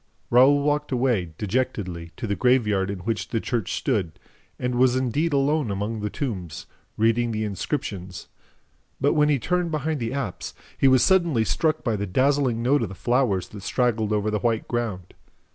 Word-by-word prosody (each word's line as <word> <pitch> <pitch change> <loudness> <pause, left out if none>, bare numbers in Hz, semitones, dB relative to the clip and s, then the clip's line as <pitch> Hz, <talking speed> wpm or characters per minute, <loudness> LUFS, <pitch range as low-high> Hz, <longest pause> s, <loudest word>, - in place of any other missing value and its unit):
Raoul 135 +4 +6
walked 150 0 0
away, 120 -10 0
dejectedly, 100 -7 -2
to - - -4
the 100 -2 -1
graveyard 105 -6 +2
in 100 -2 -5
which 110 +3 -2
the 115 - -1
church 115 -4 -2
stood 100 - -1 0.4
and 125 0 -2
was 125 0 +3
indeed 130 +6 0
alone 140 -1 +1
among 105 +3 -3
the 105 0 -2
tombs, 95 - -5 0.3
reading 115 +2 +2
the 110 0 -2
inscriptions; 100 - -4 0.7
but, 140 - +2
when 150 -1 +3
he 145 - +3
turned 180 +6 -1
behind 155 -1 -2
the 115 -1 -3
apse, 130 -9 -4 0.2
he 135 - +3
was 130 -2 +5
suddenly 170 -11 +3
struck 155 - 0
by 115 -6 0
the 100 0 -3
dazzling 130 +1 +1
note 140 +3 +3
of 110 - -2
the 95 - -8
flowers 105 -5 0
that 105 - -10
straggled 110 0 0
over 105 0 0
the 105 - 0
white 115 -1 0
ground. 110 -7 -3
120 Hz, 180 wpm, -24 LUFS, 105-135 Hz, 0.7 s, Raoul